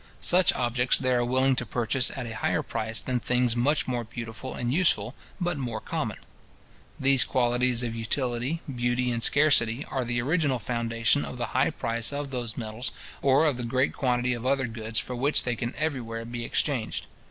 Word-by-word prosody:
Such 180 Hz, +1 st, +4 dB
objects 125 Hz, 0 st, +2 dB
they 130 Hz, -1 st, 0 dB
are 120 Hz, -1 st, +2 dB
willing 130 Hz, +2 st, +2 dB
to -, -, -1 dB
purchase 120 Hz, +2 st, +1 dB
at 130 Hz, -, -4 dB
a 110 Hz, -1 st, -6 dB
higher -, -, 0 dB
price 110 Hz, +1 st, -2 dB
than 125 Hz, -1 st, -1 dB
things 125 Hz, 0 st, +1 dB
much 140 Hz, +5 st, +1 dB
more 120 Hz, -2 st, -1 dB
beautiful 115 Hz, +2 st, -7 dB
and 120 Hz, +1 st, -2 dB
useful, 130 Hz, -, +3 dB, 0.3 s
but 175 Hz, -4 st, -1 dB
more 120 Hz, -4 st, -3 dB
common. -, -, -3 dB, 0.8 s
These 135 Hz, -2 st, +5 dB
qualities 125 Hz, 0 st, +1 dB
of 115 Hz, -2 st, -3 dB
utility, 120 Hz, +6 st, -2 dB
beauty, 120 Hz, 0 st, 0 dB
and 115 Hz, -1 st, -2 dB
scarcity, 135 Hz, -3 st, +4 dB
are 130 Hz, -, -1 dB
the 120 Hz, 0 st, -1 dB
original 145 Hz, 0 st, +1 dB
foundation 115 Hz, +3 st, 0 dB
of 125 Hz, -, -7 dB
the 120 Hz, -, -2 dB
high 130 Hz, -, +3 dB
price 115 Hz, +1 st, +1 dB
of 140 Hz, -1 st, -4 dB
those 120 Hz, -4 st, -3 dB
metals, 110 Hz, +2 st, -4 dB, 0.3 s
or 135 Hz, +3 st, +4 dB
of 145 Hz, -5 st, +1 dB
the 125 Hz, -, -4 dB
great 130 Hz, +3 st, 0 dB
quantity 125 Hz, -2 st, 0 dB
of 120 Hz, -1 st, -5 dB
other 135 Hz, 0 st, +1 dB
goods 110 Hz, -1 st, -5 dB
for 125 Hz, -, -1 dB
which 140 Hz, +5 st, +3 dB
they 120 Hz, -1 st, -1 dB
can 120 Hz, +1 st, -4 dB
everywhere 120 Hz, -7 st, -3 dB
be 120 Hz, 0 st, -5 dB
exchanged. 125 Hz, -5 st, -1 dB
125 Hz, 185 wpm, -27 LUFS, 115-135 Hz, 0.8 s, These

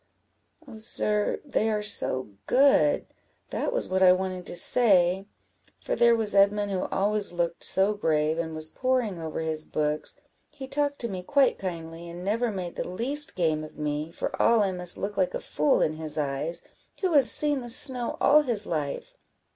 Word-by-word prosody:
"Oh, 225 Hz, -4 st, -11 dB
sir, 210 Hz, -1 st, -1 dB
they 225 Hz, -6 st, 0 dB
are 210 Hz, -1 st, -1 dB
so 130 Hz, -, 0 dB, 0.2 s
good! 280 Hz, +2 st, +3 dB, 0.5 s
that -, -, -2 dB
was -, -, -1 dB
what 190 Hz, 0 st, -1 dB
I 185 Hz, -1 st, +7 dB
wanted 185 Hz, -1 st, -4 dB
to -, -, -5 dB
say; 190 Hz, -3 st, +3 dB, 0.5 s
for -, -, -3 dB
there 235 Hz, 0 st, +4 dB
was 220 Hz, -2 st, 0 dB
Edmund 200 Hz, +1 st, +3 dB
who 185 Hz, -1 st, -2 dB
always 205 Hz, +1 st, 0 dB
looked 170 Hz, -1 st, -2 dB
so 195 Hz, +2 st, +3 dB
grave, 160 Hz, -5 st, 0 dB
and 160 Hz, -1 st, -4 dB
was 155 Hz, 0 st, -1 dB
poring 240 Hz, -3 st, -1 dB
over 160 Hz, 0 st, -4 dB
his 160 Hz, -1 st, -1 dB
books, 150 Hz, -, -3 dB, 0.3 s
he 280 Hz, -3 st, -10 dB
talked 285 Hz, +1 st, -1 dB
to 235 Hz, -, -1 dB
me 190 Hz, -4 st, -5 dB
quite 275 Hz, +7 st, +2 dB
kindly, 170 Hz, -2 st, -6 dB
and 175 Hz, +1 st, -8 dB
never 230 Hz, +4 st, 0 dB
made 180 Hz, -4 st, -6 dB
the -, -, -3 dB
least 280 Hz, -, -1 dB
game 160 Hz, -3 st, 0 dB
of 155 Hz, -, -11 dB
me, 150 Hz, +1 st, -3 dB
for -, -, -4 dB
all 230 Hz, -1 st, +4 dB
I 195 Hz, -, 0 dB
must 180 Hz, -1 st, +2 dB
look 200 Hz, +1 st, -5 dB
like 185 Hz, -2 st, 0 dB
a -, -, -2 dB
fool 150 Hz, 0 st, +1 dB
in 155 Hz, -, 0 dB
his 155 Hz, -1 st, -5 dB
eyes, 150 Hz, +3 st, -3 dB, 0.4 s
who 370 Hz, -3 st, 0 dB
has 280 Hz, -4 st, +5 dB
seen 295 Hz, -3 st, +1 dB
the 240 Hz, -, -6 dB
snow 250 Hz, 0 st, +1 dB
all 300 Hz, +1 st, +5 dB
his 235 Hz, -7 st, +1 dB
life. 150 Hz, -4 st, -4 dB
195 Hz, 185 wpm, -26 LUFS, 165-235 Hz, 0.5 s, I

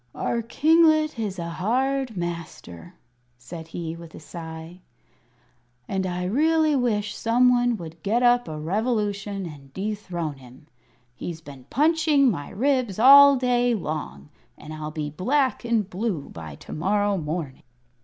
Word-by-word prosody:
"Our 235 Hz, -, -1 dB
kinglet 310 Hz, +3 st, +3 dB
is 205 Hz, -4 st, -3 dB
a 170 Hz, -1 st, -4 dB
hard 250 Hz, +6 st, -1 dB
master," 170 Hz, -, -7 dB, 0.4 s
said 160 Hz, +7 st, -9 dB
he, 165 Hz, 0 st, -5 dB
with 170 Hz, -1 st, -12 dB
a -, -, -9 dB
sigh, 160 Hz, +2 st, -9 dB, 1.1 s
"and 190 Hz, -1 st, -2 dB
I 180 Hz, 0 st, -3 dB
really 310 Hz, -, +2 dB
wish 210 Hz, -5 st, 0 dB
some 245 Hz, +2 st, +3 dB
one 245 Hz, -1 st, +2 dB
would 165 Hz, -2 st, -10 dB
get 230 Hz, +7 st, +1 dB
up 245 Hz, 0 st, +4 dB
a 155 Hz, -1 st, -5 dB
revolution 205 Hz, +1 st, -2 dB
and 140 Hz, -4 st, -11 dB
dethrone 185 Hz, -7 st, -4 dB
him. 130 Hz, +2 st, -16 dB, 0.5 s
He's 160 Hz, +6 st, -6 dB
been 140 Hz, -5 st, -13 dB
punching 300 Hz, -2 st, +3 dB
my 145 Hz, -7 st, -5 dB
ribs 250 Hz, -1 st, 0 dB
all 280 Hz, +4 st, +9 dB
day 245 Hz, -1 st, +1 dB
long, 150 Hz, -, -5 dB, 0.3 s
and 155 Hz, -, -10 dB
I'll 155 Hz, -1 st, -5 dB
be 150 Hz, -1 st, -4 dB
black 260 Hz, -, 0 dB
and 230 Hz, -4 st, 0 dB
blue 190 Hz, -6 st, -3 dB
by 80 Hz, -3 st, -9 dB
to -, -, -11 dB
morrow 205 Hz, +4 st, +1 dB
morning." 155 Hz, -4 st, -4 dB
195 Hz, 145 wpm, -24 LUFS, 160-245 Hz, 1.1 s, all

